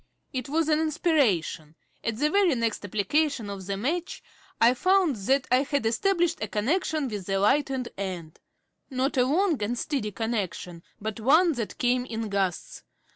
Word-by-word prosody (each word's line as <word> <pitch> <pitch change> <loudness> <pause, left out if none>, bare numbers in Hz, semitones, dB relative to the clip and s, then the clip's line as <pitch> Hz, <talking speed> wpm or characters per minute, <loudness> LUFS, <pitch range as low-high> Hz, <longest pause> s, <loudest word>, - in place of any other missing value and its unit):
It 255 0 -4
was 315 +2 +1
an 310 -1 +3
inspiration. 275 - 0 0.3
At 225 -1 -2
the 300 +4 +1
very 385 -6 +3
next 230 -3 -1
application 215 - 0
of 190 -2 -7
the 200 -1 -2
match 325 - -3 0.4
I 235 +2 +6
found 370 +1 +2
that 260 +7 +1
I 250 - +6
had 280 -3 -1
established 345 - +1
a 215 - -1
connection 295 - 0
with 205 -6 -6
the 195 0 0
lighted 265 +3 +1
end. 175 -5 -5 0.5
Not 265 +1 -1
a 250 -2 +3
long 320 - +1
and 230 +4 -1
steady 250 -6 -2
connection, 195 -6 -3 0.2
but 215 +1 -5
one 315 +10 +5
that 240 -7 -4
came 250 0 +1
in 225 -3 -4
gusts. 195 -3 -2
250 Hz, 165 wpm, -26 LUFS, 205-305 Hz, 0.5 s, I